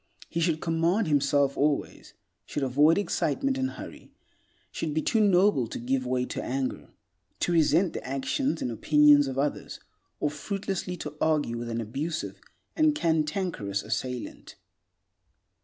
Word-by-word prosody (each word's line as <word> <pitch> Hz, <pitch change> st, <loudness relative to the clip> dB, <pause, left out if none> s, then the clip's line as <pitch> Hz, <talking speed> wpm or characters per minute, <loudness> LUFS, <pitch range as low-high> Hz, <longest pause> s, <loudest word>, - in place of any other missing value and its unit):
He 170 Hz, -, -2 dB
should 165 Hz, -2 st, +1 dB
command 170 Hz, +5 st, +1 dB
himself 140 Hz, -1 st, +2 dB
always; 145 Hz, 0 st, -1 dB, 0.3 s
should 145 Hz, -, -3 dB
avoid 145 Hz, +5 st, +4 dB
excitement 265 Hz, +6 st, 0 dB
and 265 Hz, 0 st, -1 dB
hurry; -, -, -10 dB, 0.6 s
should 155 Hz, -2 st, -3 dB
be 155 Hz, -, +2 dB
too 225 Hz, -, +2 dB
noble 190 Hz, -, +4 dB
to -, -, -6 dB
give 130 Hz, +1 st, -1 dB
way 125 Hz, 0 st, 0 dB
to -, -, -5 dB
anger, 130 Hz, +1 st, -3 dB, 0.5 s
to -, -, +1 dB
resent 165 Hz, +2 st, +3 dB
the -, -, -5 dB
actions 135 Hz, -, -1 dB
and 125 Hz, -, -2 dB
opinions 145 Hz, +4 st, +5 dB
of 135 Hz, -1 st, -4 dB
others, 145 Hz, +2 st, -2 dB, 0.4 s
or 150 Hz, -, 0 dB
fruitlessly 190 Hz, +2 st, -4 dB
to 150 Hz, -2 st, -6 dB
argue 150 Hz, -7 st, +1 dB
with 120 Hz, 0 st, -5 dB
an 115 Hz, 0 st, -2 dB
abusive 140 Hz, +9 st, -4 dB, 0.3 s
and 310 Hz, -2 st, +3 dB
cantankerous 155 Hz, -, -1 dB
assailant. 125 Hz, +3 st, -5 dB
150 Hz, 140 wpm, -27 LUFS, 135-175 Hz, 0.6 s, opinions